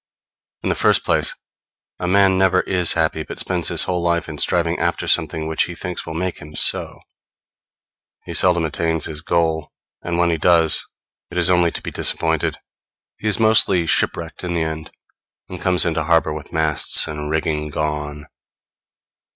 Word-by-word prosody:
In - - -1
the - - +2
first - - +2
place, - - 0 0.6
a 90 - -3
man 95 0 +3
never 95 -1 +2
is 90 -3 +1
happy, 80 -1 0
but - - -8
spends 90 -3 +2
his - - +5
whole 90 -1 -2
life 85 0 -1
in 75 -2 -8
striving - - 0
after - - -1
something 80 -1 0
which 80 0 0
he 85 - -8
thinks 90 0 -6
will 80 - -6
make 90 +2 -3
him 75 +1 -12
so; - - -1 1.2
he - - -7
seldom 85 -3 +2
attains 80 0 -1
his 75 -1 -1
goal, 80 -2 -1 0.3
and 85 -1 -3
when 85 0 +2
he 85 - -1
does, 80 -1 +4 0.5
it 90 - -8
is 90 +1 +5
only 90 -1 +3
to - - -7
be - - -6
disappointed; - - 0 0.6
he 110 - -4
is 105 - +2
mostly 110 -5 +3
shipwrecked 80 +1 -2
in 90 -1 -3
the 85 - 0
end, 80 0 -5 0.6
and 90 -2 -9
comes 90 -2 +3
into 80 -2 -1
harbor 80 -2 +2
with 75 -1 -9
masts 80 -1 +2
and 75 -1 -6
rigging 75 -1 -2
gone. 75 -1 -4
85 Hz, 175 wpm, -19 LUFS, 80-90 Hz, 1.2 s, his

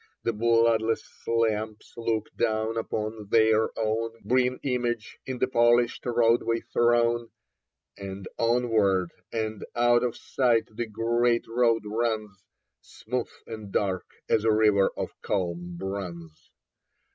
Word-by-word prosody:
The 115 - 0
bloodless 115 0 +2 0.2
lamps 110 -2 -1
look 115 -2 -2
down 110 0 0
upon 110 -1 -3
their 110 0 +4
own 115 +1 -1
Green 125 +1 +2
image 120 -4 -2
in 130 -1 -3
the 130 - +1
polished 120 0 +3
roadway 115 -1 +2
thrown, 120 0 +2 0.7
And 95 -1 -7
onward 110 -6 +2 0.2
and 110 -2 -3
out 120 0 +4
of 120 -2 -1
sight 115 -4 +1
the 120 +1 -3
great 115 +2 +1
road 115 -1 +2
runs, 110 -3 -2 0.4
Smooth 125 +1 -4 0.2
and 110 -3 -8
dark 95 -3 -1 0.2
as 110 - +2
a 110 - +4
river 105 -2 +4
of - - -3
calm 90 -2 -2
bronze. 85 -4 -6
115 Hz, 120 wpm, -27 LUFS, 105-120 Hz, 0.7 s, their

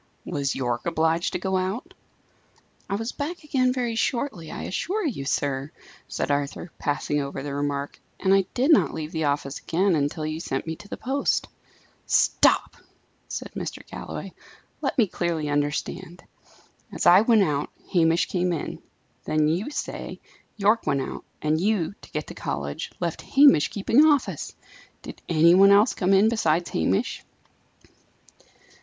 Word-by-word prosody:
"Was 140 -2 -2
Yorke 120 0 -2
obliged 165 +1 +1
to - - 0
go 190 +1 0
out?" 210 - -3 1.0
"I 195 - 0
was 225 +3 -3
back 315 +4 -5
again 260 -4 +1
very 245 -2 -1
shortly, 225 - -2
I - - -6
assure 390 - -2
you, 220 - -3
sir," 140 -1 -1 0.4
said - - -2
Arthur, 145 +4 -2
passing 145 0 -1
over 140 -1 -5
the 145 -1 -4
remark. 145 0 -3 0.2
"And 190 0 +3
I 195 -1 +4
did 265 +6 +3
not 305 - +4
leave 155 0 -5
the 160 -2 -1
office 140 -1 -1
again 185 +3 +1
until 150 +2 -1
you 155 +1 -3
sent 135 -5 -3
me 160 0 -4
to - - -13
the - - -6
post." 275 +2 -1 0.6
"Stop!" - - +3 0.5
said - - -6
Mr. - - -6
Galloway; - - -7 0.5
"let 270 - -2
me 235 - +5
clearly 170 -5 -2
understand. 145 +5 -2 0.7
As - - -3
I 185 +3 +8
went 225 -2 +4
out, 145 -4 -1 0.2
Hamish 165 -1 +3
came 180 -1 0
in. 165 -4 -4 0.4
Then, 155 0 +2
you 175 - 0
say, 295 - -5 0.4
Yorke 210 +2 +2
went 140 -1 +1
out; - - -6 0.2
and 155 +1 +1
you, 200 -4 +1
to - - -14
get 150 -1 -4
to - - -9
college, 70 +1 -4
left 170 -2 -3
Hamish 275 - +5
keeping 225 +8 +3
office! 295 -4 +1 0.5
Did - - -9
any 165 +1 +5
one 195 +2 +7
else 205 +4 +5
come 185 0 0
in 195 +2 +5
besides 175 -7 +1
Hamish?" 90 +4 0
170 Hz, 160 wpm, -25 LUFS, 145-220 Hz, 1.0 s, I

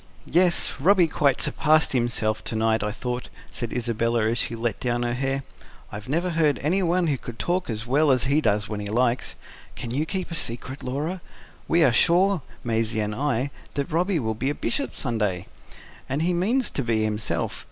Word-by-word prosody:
"Yes, 175 +1 +3
Robby 185 +4 +5
quite 145 -4 +1
surpassed 155 0 +3
himself 115 -3 0
to - - -3
night, 110 0 +2
I 105 0 -1
thought," 125 +3 -4 0.2
said 120 - -4
Isabella 115 -1 0
as 120 - -1
she 115 - -1
let 115 -2 -2
down 120 -1 -1
her 120 0 -1
hair. 135 +2 -1 0.5
"I 105 - -6
never 170 +6 0
heard 155 -5 +2
anyone 180 +2 +2
who 145 -5 0
could 120 -2 -8
talk 180 +3 -1
as 110 0 -3
well 145 +5 +3
as 130 -2 +4
he 140 +3 +2
does 105 -3 +1
when 105 -2 -4
he 105 - -4
likes. 120 +3 0 0.4
Can 115 - -5
you 145 +6 -1
keep 185 -1 -3
a - - -3
secret, 130 -2 0
Laura? 150 +8 -3 0.5
We 170 0 +4
are 130 -6 +4
sure, 180 - +3 0.2
Maisie 115 -1 0
and 105 0 -1
I, 135 +1 -1 0.2
that 140 +4 -2
Robby 175 +3 +1
will 110 -6 -1
be 130 +5 -2
a 145 - -2
Bishop 280 +3 -2
some 120 -5 -3
day. 95 -4 -1 0.6
And 140 +4 0
he 180 +1 +2
means 225 +9 +1
to - - -2
be, 115 -2 +1
himself. 105 0 -2
130 Hz, 195 wpm, -25 LUFS, 115-160 Hz, 0.6 s, Robby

